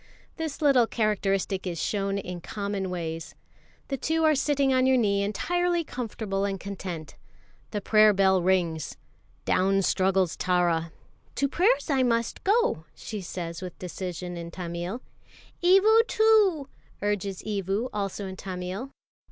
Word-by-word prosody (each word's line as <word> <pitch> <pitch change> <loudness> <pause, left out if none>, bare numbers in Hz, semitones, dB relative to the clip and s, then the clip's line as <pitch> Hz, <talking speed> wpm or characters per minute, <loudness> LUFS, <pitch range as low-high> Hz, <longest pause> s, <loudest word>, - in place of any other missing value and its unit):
This 320 -2 -4
little 260 -5 +5
characteristic 195 -4 0
is 170 -2 -3
shown 200 -1 -1
in 180 -3 -5
common 200 -1 -3
ways. 165 -2 -5 0.5
The 275 - -1
two 320 +4 0
are 310 -1 +5
sitting 280 -1 +2
on 255 0 +3
your 260 0 +4
knee 200 -4 +2
entirely 345 - 0
comfortable 220 -7 -3
and 195 -1 -2
content. 180 -4 -6 0.5
The 210 - -3
prayer 215 +1 +6
bell 190 -2 +3
rings. 175 -3 0 0.5
Down 195 +1 +2
struggles 190 -2 +2
Tara. 175 -2 +1 0.4
"To 280 - +1
prayers 370 - +2
I 270 -2 +3
must 235 -2 0
go!" 400 - +2
she 215 -2 -6
says 170 -1 -6
with 180 -2 -7
decision 180 -1 -5
in 170 0 -6
Tamil. 175 +6 -5 0.6
"Evu 420 +6 +5
too," 425 - +4 0.4
urges 200 -2 -2
Evu, 200 +2 -1
also 200 -1 -3
in 190 0 -6
Tamil. 185 +6 -5
200 Hz, 135 wpm, -27 LUFS, 180-260 Hz, 0.6 s, prayer